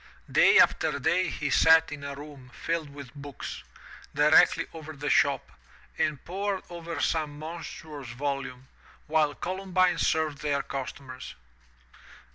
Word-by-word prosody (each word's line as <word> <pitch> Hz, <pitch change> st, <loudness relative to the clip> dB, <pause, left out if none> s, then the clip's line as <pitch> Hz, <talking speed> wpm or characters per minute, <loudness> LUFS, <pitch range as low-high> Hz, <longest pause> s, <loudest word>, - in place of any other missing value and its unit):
Day -, -, +6 dB
after -, -, +4 dB
day 185 Hz, -2 st, +1 dB
he 145 Hz, -2 st, -3 dB
sat 160 Hz, +3 st, +6 dB
in 145 Hz, -1 st, -7 dB
a 140 Hz, 0 st, -5 dB
room 140 Hz, -3 st, -11 dB
filled 165 Hz, -3 st, -2 dB
with 140 Hz, -2 st, -11 dB
books, 145 Hz, -2 st, -8 dB, 0.5 s
directly -, -, +5 dB
over 155 Hz, -1 st, -8 dB
the 145 Hz, 0 st, -2 dB
shop, 140 Hz, -1 st, +2 dB, 0.4 s
and 150 Hz, -3 st, -1 dB
pored 195 Hz, +2 st, -2 dB
over 170 Hz, -2 st, -6 dB
some 150 Hz, -2 st, -1 dB
monstrous 155 Hz, -3 st, -8 dB
volume, 130 Hz, 0 st, -4 dB, 0.4 s
while 155 Hz, -2 st, +2 dB
Columbine 185 Hz, 0 st, 0 dB
served 155 Hz, -3 st, +1 dB
their 145 Hz, -2 st, 0 dB
customers. 130 Hz, -1 st, -7 dB
150 Hz, 125 wpm, -28 LUFS, 140-165 Hz, 0.5 s, Day